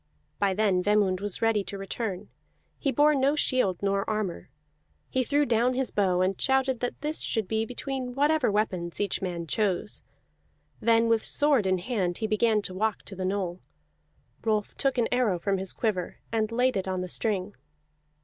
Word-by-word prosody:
By 195 -2 +2
then 200 -3 +2
Vemund 200 -2 +2
was 205 +1 -3
ready 225 -2 +2
to 200 - -6
return; 195 0 -4 0.5
he 275 - 0
bore 295 +2 +4
no 275 +1 +2
shield 255 -11 +2
nor 200 +1 0
armor; 210 -9 -3 0.6
he 260 - +1
threw 290 +3 +2
down 240 +1 +2
his 265 0 0
bow, 185 -3 +2
and 185 +1 0
shouted 265 -2 +2
that 245 - -3
this 300 +2 -1
should 220 -4 -1
be 220 +1 -1
between 250 0 -4
whatever 295 -1 +3
weapons 185 -5 -1
each 205 - -1
man 175 -3 -3
chose. 195 0 -1 0.8
Then 230 0 +3
with 230 -1 +2
sword 285 -9 +3
in 185 0 +2
hand 180 -3 -1
he 220 - -2
began 215 0 +2
to 185 - -6
walk 215 +3 -1
to 195 - -9
the 185 0 -3
knoll. 185 -2 -2 0.8
Rolf 215 -2 0
took 270 -2 0
an 235 - +2
arrow 245 -7 +2
from 195 +2 -1
his 190 0 -4
quiver 195 -6 -2
and 220 -1 0
laid 250 0 +2
it 190 - -2
on 185 -1 -1
the 180 - -4
string. 200 0 -1
215 Hz, 180 wpm, -27 LUFS, 190-245 Hz, 0.8 s, bore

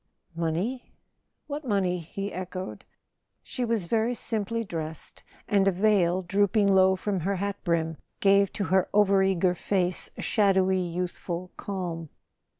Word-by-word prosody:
"Money? 170 +10 -2 0.5
What 295 +1 -5
money?" 195 -7 0
he 195 +5 -5
echoed. 185 +1 -6 0.6
She 250 - -3
was 225 -6 0
very 225 +6 +1
simply 230 0 -2
dressed, 160 -5 -6 0.3
and 200 -1 +3
a - - +5
veil, 185 -2 +2
drooping 200 +2 +2
low 190 0 +5
from 195 0 -2
her 195 +4 -1
hat 200 +1 -3
brim, 165 -2 0 0.2
gave 200 0 +4
to 205 - -2
her 190 -1 +3
over 200 -1 +4
eager 185 -2 +2
face 180 -1 0
a - - -5
shadowy 190 -3 +3
youthful 180 0 -4
calm. 175 -5 -4
190 Hz, 140 wpm, -27 LUFS, 180-205 Hz, 0.6 s, a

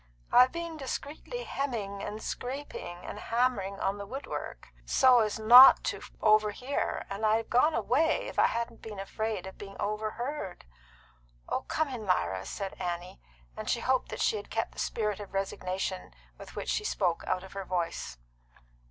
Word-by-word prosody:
"I've 250 +1 +7
been 335 -1 -5
discreetly 300 - -5
hemming 215 - -3
and 215 +2 -5
scraping 245 -9 -5
and - - -6
hammering 230 -5 0
on 200 +1 -1
the 200 - -5
wood 270 +6 -6
work - - -6
so 255 -2 +5
as 215 -2 +1
not 240 +4 +9
to - - -2 0.2
overhear, 215 +5 +2
and 200 +2 -6
I'd 215 0 +4
have 225 - -5
gone 300 +6 +4
away 315 +6 +2
if - - -4
I - - +6
hadn't 235 0 -3
been 210 -3 -8
afraid 215 0 -3
of 190 - -10
being 195 -1 -9
overheard." 215 +1 -3 0.8
"Oh, - - -1
come 315 0 0
in, 235 -6 -6
Lyra," 95 - 0
said 195 -1 -4
Annie; 180 0 -4 0.3
and - - -5
she - - +1
hoped 260 0 +1
that - - -5
she 445 - +2
had 420 - -8
kept - - -2
the - - -11
spirit 210 -3 -1
of 200 -1 -9
resignation 190 -1 -3 0.2
with - - -12
which - - -4
she 430 - 0
spoke 180 - 0
out 185 - 0
of 190 - -11
her 195 0 -4
voice. 175 - -3
215 Hz, 175 wpm, -30 LUFS, 195-255 Hz, 0.8 s, not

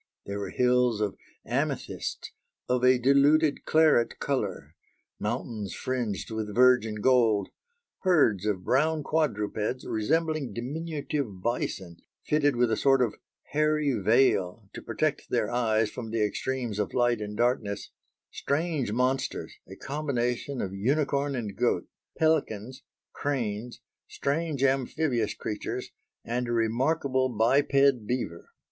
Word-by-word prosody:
There 100 +1 -4
were 100 - -4
hills 125 -3 +2
of 105 -3 -1 0.3
amethysts - - -3 0.4
"of 125 0 +1
a 130 0 +6
diluted 140 +4 +3
claret 155 -7 +3
colour"; 100 - -3 0.5
mountains 110 -2 -3
fringed 120 -6 -3
with 110 -2 -4
virgin 120 -4 +4
gold; 115 -5 +3 0.5
herds 120 - +3
of 95 -3 -1
brown 155 - +2
quadrupeds 125 -6 -1
resembling 155 +5 0
diminutive 140 - -4
bison 95 -7 -2 0.3
fitted 145 -3 +2
with 120 -1 +2
a 110 - +1
sort 135 -2 +4
of 115 - -1 0.4
"hairy 150 -1 +2
veil" 110 -2 +2
to - - -7
protect - - -2
their - - 0
eyes 110 -3 +1
from 115 -3 -6
the 110 -1 0
extremes 120 0 -3
of 105 - -2
light 120 -2 +2
and 105 0 -5
darkness; 120 -4 0 0.4
strange 145 -5 -1
monsters 130 +3 -1
a 95 - -10
combination 135 -2 -2
of 95 - -4
unicorn 140 +6 0
and 105 -5 -4
goat; 115 -7 +1 0.3
pelicans, 130 -6 0 0.3
cranes, 120 -4 -3 0.3
strange 145 -1 -2
amphibious 135 -3 +1
creatures, 105 -1 -5 0.3
and 120 +1 -2
a - - -2
remarkable 130 +3 +1
biped 135 +1 +3
beaver. 120 -9 -3
125 Hz, 120 wpm, -28 LUFS, 110-140 Hz, 0.5 s, a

